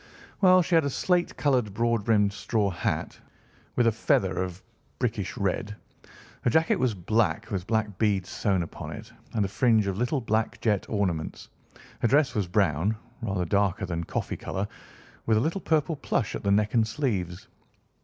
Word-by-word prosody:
"Well, 185 -1 +6
she 175 - -3
had 165 -1 +6
a 140 - 0
slate 175 +5 0
coloured, 125 -8 +1
broad 115 -2 +1
brimmed 105 -3 +3
straw 105 -1 0
hat, 80 - -2 0.6
with 120 - +3
a 115 - +5
feather 95 -4 +1
of 90 -2 -4
a - - -24 0.4
brickish - - -2
red. 105 - -1 0.7
Her - - +2
jacket 160 +6 +3
was 125 -4 +1
black, 100 +2 0
with 95 -1 -3
black 110 -4 -1
beads 100 -4 +1
sewn 95 -4 0
upon 80 - -7
it, - - -10 0.2
and 105 -3 +2
a - - -1
fringe 110 +1 +3
of 100 0 -2
little 125 +4 +1
black 110 -2 -1
jet 105 -4 0
ornaments. 90 -7 -2 0.5
Her - - +2
dress 140 +2 +3
was 105 -6 -1
brown, 95 +2 +1 0.2
rather 95 -5 -1
darker 100 +2 +1
than 85 -2 -3
coffee - - -3
colour, 95 +2 -3 0.6
with 110 -1 +4
a - - +2
little 165 +7 -1
purple 160 0 +1
plush 135 -5 -1
at - - -4
the 100 - -1
neck 105 +1 +2
and 115 -2 +3
sleeves. 100 - -2
105 Hz, 180 wpm, -27 LUFS, 95-120 Hz, 0.7 s, Well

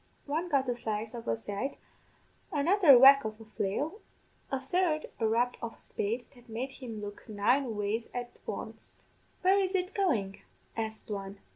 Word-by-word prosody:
One 320 +5 -1
got 275 -4 +2
a 245 - +1
slice 220 -1 -3
of 235 -1 -7
a - - +1
scythe, 220 +5 -4 0.7
another 330 +1 +6
a - - +10
whack 275 +2 +9
of 215 0 -5
a 225 - -11
flail, 220 - -2 0.5
a 270 - 0
third 310 +3 0
a 225 - +2
rap 240 +3 +1
of 230 -1 -5
a - - -26
spade 230 +4 -3
that 245 -2 -19
made 245 +4 -3
him 230 -6 -7
look 205 +1 -8
nine 225 +3 +1
ways 210 +3 -1
at 245 -1 -4 0.2
wanst. - - -7 0.4
"'Where 380 +2 +5
is 380 0 0
it 370 +1 0
goin'?' 230 - 0 0.4
asked 220 -1 -4
one. 195 -1 -5
245 Hz, 175 wpm, -31 LUFS, 220-285 Hz, 0.7 s, a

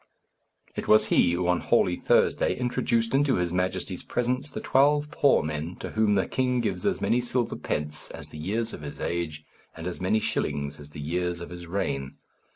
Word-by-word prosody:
It - - -4
was 110 - +6
he 85 - +4
who, 90 0 0
on 90 0 +3
Holy 90 - +2
Thursday, - - +2
introduced 120 -2 0
into 140 -1 +3
his 90 -1 -1
Majesty's 90 0 -1
presence 125 +4 -1
the - - -5
twelve 145 +2 +3
poor 140 -4 +4
men 75 +3 -3
to - - -7
whom 110 -1 +2
the 95 - +2
king 125 -1 +1
gives 100 -6 -1
as - - 0
many 125 - +2
silver 120 -1 -1
pence 75 0 -3
as - - -6
the 75 - -10
years 110 +8 -2
of - - -7
his 75 -1 -7
age, 80 -3 -3 0.3
and 80 - -7
as 90 0 -4
many 95 +4 +2
shillings 70 -6 -2
as 75 0 -11
the 75 - -10
years 90 +3 -2
of 85 - -8
his 85 -1 -8
reign. 70 -8 -2
90 Hz, 195 wpm, -27 LUFS, 80-120 Hz, 0.3 s, was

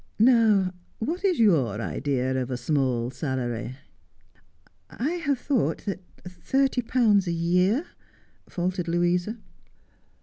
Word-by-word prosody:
Now, 215 -5 +4 0.2
what 330 - -3
is 375 -4 +2
your 145 - +3
idea 130 - -1
of 125 - -4
a 125 - -2
small 125 -2 0
salary? 125 -2 -3 0.4
' - - -35 0.2
' - - -35
I 280 +7 -2
have 320 -6 -1
thought 240 - -1
that 200 -2 -3 0.3
thirty 265 +8 0
pounds 220 -5 +2
a - - 0
year 180 - +1 0.3
' - - -33
faltered 180 0 -2
Louisa. 175 +5 0
180 Hz, 130 wpm, -26 LUFS, -, 0.4 s, Now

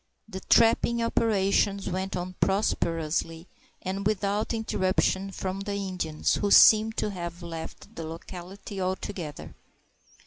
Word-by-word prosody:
The 190 -3 -6
trapping 230 +3 +3
operations 200 -3 +1
went 190 0 -3
on 180 0 -4
prosperously 165 -4 0 0.4
and 190 +1 -3
without 210 0 0
interruption 195 -3 0
from 190 0 -4
the 200 0 -4
Indians, 185 -6 -1
who 205 - 0
seemed 220 +2 +7
to 210 - -1
have 175 -2 -6
left 165 -1 -8
the 165 - -5
locality 180 +4 -8
altogether. 185 -4 -4
190 Hz, 115 wpm, -27 LUFS, 175-205 Hz, 0.4 s, seemed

